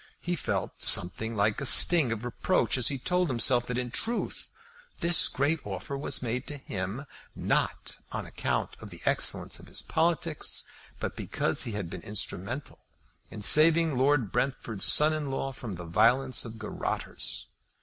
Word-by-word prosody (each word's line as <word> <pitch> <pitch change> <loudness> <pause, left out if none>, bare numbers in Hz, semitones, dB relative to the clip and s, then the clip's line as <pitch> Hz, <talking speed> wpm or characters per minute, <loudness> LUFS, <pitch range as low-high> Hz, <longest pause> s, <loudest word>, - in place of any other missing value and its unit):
He 175 0 -3
felt 160 - -4
something 110 +6 +3
like 100 +2 0
a - - -3
sting 160 -6 +8
of 115 +1 -5
reproach 120 - -1
as 125 -3 0
he 140 - 0
told 180 +5 -1
himself 120 0 +2
that 125 - -4
in 125 -1 -4
truth 230 - -5 0.5
this 170 -2 +6
great 145 +4 -1
offer 100 +7 -6
was 140 -1 -2
made 125 +2 -4
to 145 - -6
him, 105 +1 -6 0.3
not - - -2
on - - -5
account - - -3
of - - -11
the - - -12
excellence - - +1
of - - -14
his - - -4
politics, 165 -1 0 0.3
but - - -5
because - - -1
he 115 - -5
had 100 -4 -5
been 90 +1 -9
instrumental 105 - -5 0.5
in 105 - -8
saving 160 +3 +5
Lord 130 -4 +1
Brentford's 120 -6 -1
son 155 +1 +5
in 150 -2 -4
law 135 0 -4
from 120 -5 -8
the 90 -1 -8
violence 120 +11 +2
of 115 -1 -9
garrotters. 110 -1 -5
125 Hz, 165 wpm, -27 LUFS, 110-150 Hz, 0.5 s, sting